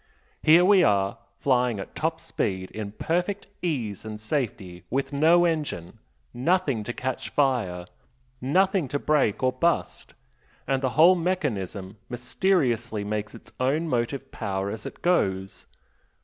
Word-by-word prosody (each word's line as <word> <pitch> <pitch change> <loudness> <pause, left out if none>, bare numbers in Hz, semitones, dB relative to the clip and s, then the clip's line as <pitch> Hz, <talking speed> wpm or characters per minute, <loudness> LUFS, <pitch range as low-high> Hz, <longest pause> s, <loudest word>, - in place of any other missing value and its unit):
Here 165 +3 +6
we 195 -1 +6
are, 100 -4 +2 0.2
flying 125 -3 +1
at 95 - -7
top - - -1
speed 95 -1 -3
in 105 -2 -6
perfect 180 - -1 0.2
ease 125 - -2
and 110 -1 -7
safety 110 - -3
with 135 +1 -1
no 165 +5 +5
engine 150 - -2 0.3
nothing 140 - +1
to 120 - -2
catch 130 +1 -4
fire 115 -11 0 0.6
nothing 185 +4 +2
to 145 - -1
break 145 -7 +1
or 130 0 +3
bust 170 +6 -1 0.5
and 135 0 +1
the 130 - +1
whole 170 +4 +8
mechanism 110 - -2
mysteriously 120 - 0
makes 105 0 -3
its - - -14
own 145 +6 +1
motive 125 0 -2
power 100 -2 -3
as 110 0 -6
it - - -11
goes. 95 - 0
130 Hz, 135 wpm, -26 LUFS, 105-160 Hz, 0.6 s, whole